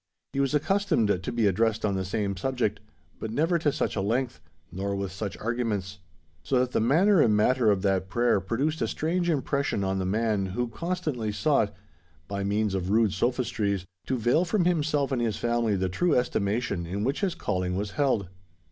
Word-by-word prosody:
He 135 Hz, -, -1 dB
was 140 Hz, +1 st, +1 dB
accustomed 150 Hz, -, +2 dB
to -, -, -4 dB
be 115 Hz, -2 st, +1 dB
addressed 110 Hz, +3 st, +1 dB
on 100 Hz, -, +1 dB
the 95 Hz, -1 st, -1 dB
same 100 Hz, +1 st, -2 dB
subject, 110 Hz, -1 st, -1 dB, 0.4 s
but 110 Hz, -, -4 dB
never 165 Hz, +9 st, +1 dB
to 150 Hz, -2 st, +2 dB
such -, -, -2 dB
a 100 Hz, -, 0 dB
length, 115 Hz, -, -1 dB, 0.3 s
nor 100 Hz, +3 st, -2 dB
with 100 Hz, -1 st, -3 dB
such 100 Hz, +2 st, -5 dB
arguments; 105 Hz, -4 st, -2 dB, 0.4 s
so 130 Hz, -, 0 dB
that 125 Hz, 0 st, +1 dB
the -, -, +1 dB
manner 165 Hz, -, +4 dB
and 105 Hz, -2 st, +4 dB
matter 120 Hz, +1 st, +3 dB
of 100 Hz, -2 st, +2 dB
that 95 Hz, -2 st, +1 dB
prayer 120 Hz, -2 st, +2 dB
produced 135 Hz, -, -1 dB
a -, -, +1 dB
strange 175 Hz, +3 st, -1 dB
impression 140 Hz, -7 st, 0 dB
on 95 Hz, 0 st, 0 dB
the 95 Hz, -, -1 dB
man 105 Hz, -1 st, 0 dB
who 120 Hz, +6 st, -2 dB
constantly 155 Hz, -5 st, -2 dB
sought, 110 Hz, -1 st, +2 dB, 0.6 s
by 100 Hz, 0 st, -3 dB
means 105 Hz, +1 st, 0 dB
of 95 Hz, -1 st, -2 dB
rude 110 Hz, -1 st, +3 dB
sophistries, 115 Hz, -6 st, -1 dB, 0.2 s
to 130 Hz, -, 0 dB
veil 120 Hz, +9 st, +3 dB
from 180 Hz, 0 st, +1 dB
himself 150 Hz, -5 st, +1 dB
and 125 Hz, -3 st, 0 dB
his 115 Hz, -3 st, 0 dB
family 120 Hz, -3 st, +1 dB
the 95 Hz, -1 st, 0 dB
true 160 Hz, -, +1 dB
estimation 105 Hz, -6 st, 0 dB
in 100 Hz, +4 st, -3 dB
which 135 Hz, -, -1 dB
his 195 Hz, -4 st, 0 dB
calling 90 Hz, 0 st, -2 dB
was 100 Hz, +1 st, -2 dB
held. 130 Hz, -9 st, +1 dB
115 Hz, 190 wpm, -27 LUFS, 100-135 Hz, 0.6 s, manner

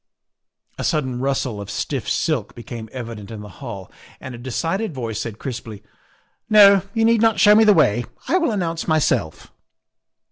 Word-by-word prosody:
A -, -, -3 dB
sudden 130 Hz, -6 st, -1 dB
rustle 130 Hz, -5 st, -2 dB
of 100 Hz, -, -8 dB
stiff -, -, -3 dB
silk -, -, -1 dB
became 120 Hz, -2 st, -8 dB
evident 115 Hz, -5 st, -7 dB
in 110 Hz, -2 st, -8 dB
the 105 Hz, -, -9 dB
hall 100 Hz, -8 st, -8 dB, 0.3 s
and 130 Hz, -, -8 dB
a 120 Hz, -, -9 dB
decided 165 Hz, -, -3 dB
voice 115 Hz, -4 st, -4 dB
said 110 Hz, -2 st, -6 dB
crisply: 115 Hz, -5 st, -7 dB, 0.3 s
' -, -, -36 dB
' -, -, -48 dB
No, 200 Hz, -2 st, +7 dB
you 225 Hz, 0 st, +2 dB
need 230 Hz, -1 st, +3 dB
not 225 Hz, -2 st, +3 dB
show 210 Hz, -, +7 dB
me 220 Hz, +1 st, +6 dB
the 210 Hz, -, +7 dB
way. 120 Hz, -6 st, +3 dB, 0.2 s
I 370 Hz, -, +2 dB
will 335 Hz, -, +1 dB
announce 170 Hz, -6 st, -2 dB
myself. 155 Hz, -, 0 dB
130 Hz, 180 wpm, -21 LUFS, -, 0.3 s, No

